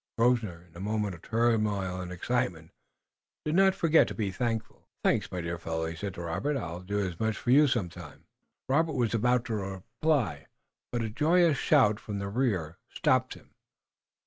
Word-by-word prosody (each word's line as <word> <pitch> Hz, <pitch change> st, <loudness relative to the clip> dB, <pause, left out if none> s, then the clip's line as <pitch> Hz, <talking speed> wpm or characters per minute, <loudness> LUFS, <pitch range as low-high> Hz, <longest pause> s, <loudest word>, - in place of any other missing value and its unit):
Grosvenor, 115 Hz, -8 st, +1 dB
in 85 Hz, -, -25 dB
the 85 Hz, -, -11 dB
moment 105 Hz, 0 st, -1 dB
of 85 Hz, -, -11 dB
turmoil 105 Hz, -5 st, 0 dB
and 90 Hz, 0 st, -6 dB
excitement, 90 Hz, -4 st, -2 dB, 0.7 s
did 155 Hz, -, 0 dB
not 190 Hz, +1 st, +5 dB
forget 165 Hz, -4 st, +4 dB
to -, -, -6 dB
be 105 Hz, -4 st, -1 dB
grateful. 115 Hz, +2 st, -3 dB, 0.2 s
"Thanks, -, -, +1 dB
my 90 Hz, -, -3 dB
dear 85 Hz, 0 st, -4 dB
fellow," 80 Hz, -1 st, -3 dB
he 80 Hz, +1 st, -4 dB
said 100 Hz, +2 st, -5 dB
to 85 Hz, -, -6 dB
Robert. 140 Hz, -, -1 dB
"I'll 85 Hz, -7 st, -5 dB
do 100 Hz, +3 st, -2 dB
as 90 Hz, -4 st, -4 dB
much 110 Hz, -1 st, 0 dB
for 120 Hz, -, -1 dB
you 145 Hz, +3 st, +7 dB
some 120 Hz, -8 st, 0 dB
time." 80 Hz, -, -12 dB, 0.4 s
Robert 155 Hz, +4 st, +2 dB
was 120 Hz, -5 st, 0 dB
about 120 Hz, +2 st, +2 dB
to 115 Hz, -, -3 dB
reply, 100 Hz, -, -1 dB, 0.4 s
but 120 Hz, -1 st, -1 dB
a 110 Hz, -, -2 dB
joyous 160 Hz, +2 st, +3 dB
shout 105 Hz, 0 st, +4 dB
from 105 Hz, -2 st, -5 dB
the 100 Hz, 0 st, -3 dB
rear 100 Hz, -9 st, -1 dB
stopped -, -, +1 dB
him. -, -, -18 dB
110 Hz, 185 wpm, -29 LUFS, 90-125 Hz, 0.7 s, you